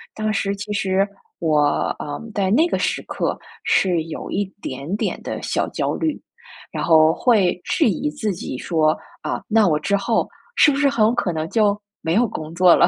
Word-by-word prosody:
当 215 0 -1
时 200 -2 0
其 205 +1 -6
实 195 0 +1 0.3
我， 155 -3 +2 0.4
呃， 145 -1 -5
在 195 -2 0
那 315 +11 +4
个 - - 0
时 - - 0
刻 - - -2 0.3
是 175 -4 +2
有 165 - -6
一 200 +1 0 0.2
点 140 +7 -5
点 - - -2
的 - - -4
小 - - -1
焦 - - -1
虑， 315 -3 -2 0.5
然 - - -3
后 160 -1 +5
会 195 -5 +2
质 - - +2
疑 295 +8 -1
自 220 -8 -2
己 150 -6 -5
说， 155 +1 +1 0.3
啊， - - -2
那 220 -3 +4
我 150 -2 +2
之 200 +6 +1
后 220 +3 0 0.3
是 315 - +6
不 275 - -1
是 285 -1 +4
很 235 -5 +2
有 225 - +3
可 240 -7 0
能 160 0 -2
就 210 -2 +2 0.2
没 160 - 0
有 235 +3 +4
工 155 -5 -6
作 180 -1 +6
了， - - +5
195 Hz, 215 characters per minute, -21 LUFS, 160-220 Hz, 0.5 s, 是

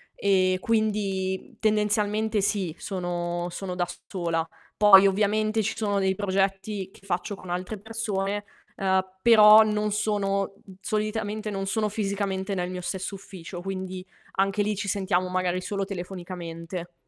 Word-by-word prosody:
E 185 -2 +3
quindi, 200 -3 0
mhmm, - - -22
tendenzialmente 210 0 +1
sì, 195 -5 0
sono 175 -2 -3
sono 185 0 -5
da 175 -1 0 0.2
sola. 170 -4 -1 0.3
Poi 200 -2 +8
ovviamente 215 +2 +1
ci 215 - -2
sono 205 -3 0
dei 190 -1 +2
progetti 195 0 -1
che 195 - -19
faccio 190 +2 -2
con 185 - -12
altre 180 +4 -3
persone, 205 -2 -2 0.3
ehm, 190 -1 +2 0.2
però 215 -1 +9
non 210 0 0
sono 200 -2 0
mhmm, 190 - -14
solitamente 215 0 -2
non 195 -1 -3
sono 215 +2 0
fisicamente 200 -1 -2
nel 180 -1 -2
mio 180 0 -5
stesso 190 +2 -4
ufficio, 185 -2 -9
quindi 185 -1 -5 0.3
anche 195 +2 +1
lì 210 +1 0
ci 200 +1 -4
sentiamo 185 -2 0
magari 185 0 0
solo 195 +1 -2
telefonicamente. 175 -2 -6
195 Hz, 145 wpm, -26 LUFS, 185-210 Hz, 0.3 s, però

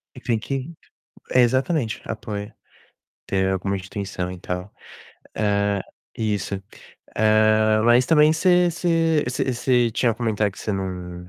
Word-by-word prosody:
É - - -9
que - - -27
tem 115 -2 +1
que 135 +6 -4 0.6
é, 125 - +4
exatamente, 130 0 0
apoio, 105 -2 -6 0.7
ter 95 -1 0
alguma 95 +1 -1
instituição 95 -1 -5
e 90 - -9
tal. 90 +2 -5 0.6
Hã, 100 -2 +1 0.4
isso. 105 -3 -2 0.6
Hã, 110 0 +4
mas 120 +2 +5
também 155 -1 +5
você 180 +1 +3
você 165 -2 +1
você 125 - -1
você 120 -1 +2
tinha 115 +1 +1
comentado 110 -3 -1
que - - -15
você 105 - -3
não 90 -2 -5
110 Hz, 140 wpm, -23 LUFS, 100-130 Hz, 0.7 s, mas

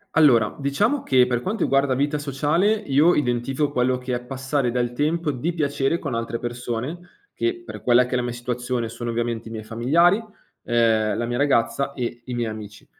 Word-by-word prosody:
Allora, 125 -9 +5
diciamo, 205 - +1
che 130 -2 +4
per 125 -1 0
quanto 205 - -2
riguarda 135 -1 +2
vita 145 +2 0
sociale, 145 +7 +1
io 165 -5 +3
identifico 135 +2 0
quello 125 -1 +1
che 125 0 -4
è 120 - -2
passare 130 +1 -2
del 120 0 -1
tempo 150 +4 0
di 155 +7 -2
piacere 145 0 0
con - - -3
altre 115 0 -2
persone 120 +6 -4 0.3
che 355 0 -2
per - - -8
quella 125 0 +4
che 125 - -6
è - - +2
la - - 0
mia 120 - -3
situazione, 120 -1 -3
sono 120 +1 -5
ovviamente 115 -1 -2
i 115 - -8
miei 110 -1 -6
familiari, 155 - +3 0.4
ehm, 110 -3 +2
la 120 - -1
mia 120 +1 -2
ragazza 140 -1 +1
e 120 -2 -4
i 125 - -5
miei 120 -2 -1
amici. 105 -1 -9
125 Hz, 195 wpm, -23 LUFS, 120-145 Hz, 0.4 s, Allora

